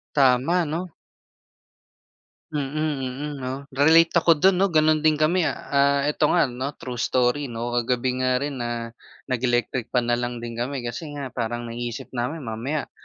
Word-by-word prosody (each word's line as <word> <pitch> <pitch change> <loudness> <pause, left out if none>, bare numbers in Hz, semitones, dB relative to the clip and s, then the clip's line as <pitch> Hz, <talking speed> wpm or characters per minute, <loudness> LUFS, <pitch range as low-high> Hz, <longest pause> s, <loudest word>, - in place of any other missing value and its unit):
Tama 140 +6 +3
'no. 165 +4 -4 1.6
Mm, 150 0 -2
mm, 135 +3 -4
'no. 130 -1 -4 0.2
Relate 160 +5 +5
ako 165 0 +5
dun 190 -1 +5
'no, 195 - +4
ganun 155 0 +4
din 155 - +5
kami, 155 +3 +2
ah, - - -5
ah, 140 0 +3
eto 150 0 +2
nga 165 -7 +3
'no, 130 +4 -4
true 125 -3 -7
story 130 +4 +1
'no. 120 0 -4
Kagabi 125 +1 0
nga 130 0 +1
rin, 140 -2 -3
ah, 120 -1 -3 0.4
nag-electric 120 -1 0
fan 120 -1 +2
na 120 - +2
lang 120 -1 -4
din 115 -1 -6
kami 130 +2 -3
kasi 125 +6 -6
nga 140 -3 -5
parang 120 -1 -3
naiisip 120 +2 -5
namin 130 +6 -3
mamaya, 125 +6 -3
130 Hz, 165 wpm, -24 LUFS, 120-150 Hz, 1.6 s, Relate